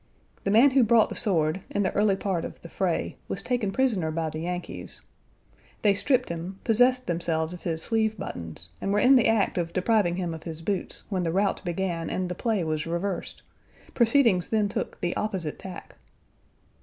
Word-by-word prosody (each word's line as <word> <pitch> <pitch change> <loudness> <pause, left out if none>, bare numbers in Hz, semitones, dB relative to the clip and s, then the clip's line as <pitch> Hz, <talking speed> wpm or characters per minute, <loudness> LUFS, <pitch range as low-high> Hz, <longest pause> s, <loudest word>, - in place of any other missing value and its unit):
The - - +1
man 235 +7 +6
who 260 -1 +5
brought 225 -1 +4
the - - -6
sword, 170 -5 +1
in 205 - 0
the - - 0
early 205 -1 +3
part 190 -4 -2
of - - -7
the - - -9
fray, - - -1
was - - -4
taken 245 -6 0
prisoner 220 -10 +1
by 160 0 -2
the 155 - -5
Yankees. 180 +2 -6 0.8
They 205 -2 +5
stripped 250 +5 +1
him, 170 +3 -5
possessed 250 +3 +3
themselves 165 -1 -1
of 180 - -9
his 160 -2 -1
sleeve 220 -1 +1
buttons, 85 - -6
and 195 - -1
were 205 - +2
in 260 +5 +6
the 245 - +5
act 220 -4 +2
of 170 -1 -3
depriving 185 -2 +2
him 175 -2 -2
of 160 - -7
his 165 -1 -7
boots 195 0 -2
when 190 -3 -1
the 165 -2 0
rout 195 +3 0
began 175 -2 -2
and 185 -1 -2
the - - -2
play 210 0 0
was 155 0 -2
reversed; 170 +2 -3 0.5
proceedings 230 -6 +4
then 215 -2 +1
took - - -4
the 175 0 -1
opposite 190 -8 -3
tack. 190 -1 -9
190 Hz, 195 wpm, -26 LUFS, 170-220 Hz, 0.8 s, man